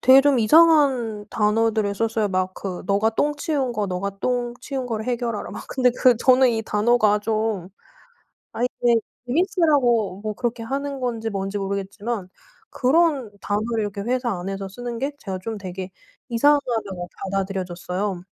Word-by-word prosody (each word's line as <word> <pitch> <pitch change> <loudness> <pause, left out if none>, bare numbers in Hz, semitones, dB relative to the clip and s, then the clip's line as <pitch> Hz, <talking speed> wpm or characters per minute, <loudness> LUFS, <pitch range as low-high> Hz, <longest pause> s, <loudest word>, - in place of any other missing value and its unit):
되게 260 +2 +8
좀 280 -2 +3
이상한 260 -6 +4
단어들을 215 -1 +1
썼어요. 225 0 0
막 185 -1 -1
그 185 -3 -5
"네가 205 +3 +3
똥 295 +6 0
치운 280 -5 -1
거 210 -3 -1
네가 195 +2 -4
똥 245 0 -1
치운 265 -1 -4
거를 220 -3 -3
해결하라." 240 -3 -2
막 - - -7
근데 255 -1 +2
그 250 -2 +4
저는 255 +2 +5
이 225 -1 -1
단어가 215 0 +3
좀 215 -4 -1 0.8
아 - - -7
이게 240 -1 +2 0.3
재밌으라고 275 - +2
뭐 215 0 -2
그렇게 235 +2 -3
하는 275 +3 -3
건지 230 -3 -2
뭔지 195 0 -3
모르겠지만 200 +1 -4 0.4
그런 280 -3 +2
단어를 220 +3 -1
이렇게 205 -1 -4
회사 245 +3 -1
안에서 195 +2 -4
쓰는 240 +4 -6
게 275 +4 -2
제가 190 -6 -5
좀 220 0 -4
되게 185 0 -6 0.4
이상하다고 230 -8 +1 0.2
받아들여졌어요. 190 -1 -3
225 Hz, 325 characters per minute, -23 LUFS, 200-250 Hz, 0.8 s, 되게